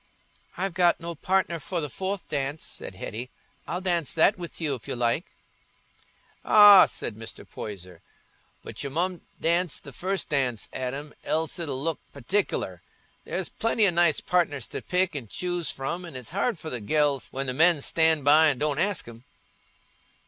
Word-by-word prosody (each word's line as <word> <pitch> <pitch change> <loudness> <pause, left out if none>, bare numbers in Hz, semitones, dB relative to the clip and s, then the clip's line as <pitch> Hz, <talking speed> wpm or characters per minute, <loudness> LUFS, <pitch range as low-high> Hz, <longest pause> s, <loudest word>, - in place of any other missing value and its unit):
"I've 190 0 -1
got 175 -1 +3
no 170 0 -5
partner 180 +1 0
for 175 +4 -3
the 150 - -2
fourth 190 +6 -4
dance," 140 +1 -3
said 95 - -7
Hetty; 115 +6 -6 0.4
"I'll 180 - -3
dance 175 -6 0
that 165 +5 +5
with 175 -2 -8
you, 155 -4 0
if 125 - -7
you - - -3
like." 120 - 0 1.2
"Ah," 205 -2 +9
said - - -5
Mr. 115 0 -9
Poyser, 90 -4 -8 0.6
"but - - -7
you 140 - -3
mun 175 +5 -2 0.2
dance 170 0 +1
the 140 - -12
first 190 +6 -3
dance, 130 -6 0
Adam, 135 +3 -4
else 160 +3 -1
it'll 145 -6 -3
look 165 -3 -1 0.2
partic'ler. 120 - -1 0.5
There's 190 -1 -3
plenty 225 -1 +1
o' 195 - +4
nice 170 -3 +3
partners 145 -8 0
to - - -5
pick 185 -2 0
an' 130 -5 -5
choose 175 - -2
from, 170 +7 -4
an' 165 -6 -9
it's 125 0 -7
hard 200 +3 0
for 155 0 -7
the 125 - -4
gells 145 +3 +1
when 135 +1 -3
the 130 - -2
men 160 +3 +5
stan' 160 -2 +3
by 155 +3 +6
and 140 -4 +1
don't 150 0 0
ask 190 - 0
'em." 115 0 -12
160 Hz, 175 wpm, -26 LUFS, 135-180 Hz, 1.2 s, Ah